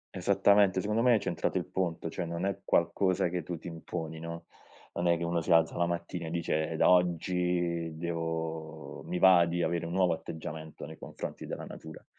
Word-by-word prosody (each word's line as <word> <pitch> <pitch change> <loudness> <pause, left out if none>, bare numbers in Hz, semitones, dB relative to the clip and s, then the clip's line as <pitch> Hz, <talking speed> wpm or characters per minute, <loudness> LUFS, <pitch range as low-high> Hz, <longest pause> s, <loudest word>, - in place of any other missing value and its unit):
Esattamente. 100 -2 +4
Secondo 105 +4 0
me, 125 0 +5
hai 110 - +4
centrato - - -1
il - - -1
punto, 85 -3 -2
cioè 90 - -3
non 85 +2 -3
è 100 0 -1
qualcosa 90 +1 +2
che 90 0 -2
tu 85 +2 -5
ti 85 - -10
imponi, 80 -1 -5
no, 85 +1 -7 0.5
non 85 - -1
è 85 -1 +4
che 85 - -4
uno 85 0 0
si 85 - -2
alza 80 -1 +4
la 85 0 +1
mattina 85 0 -3
e - - -4
dice: 80 -1 -1
"Da - - +4
oggi, 90 -2 +1
devo 80 -2 -4
mi 90 - -3
va 90 -2 +7
di 85 +1 -1
avere 85 -1 -1
un 85 - -5
nuovo 90 -2 +3
atteggiamento 80 -1 -7
nei 80 +1 -10
confronti - - -7
della - - -5
natura". 80 -1 -10
85 Hz, 195 wpm, -30 LUFS, 80-90 Hz, 0.5 s, va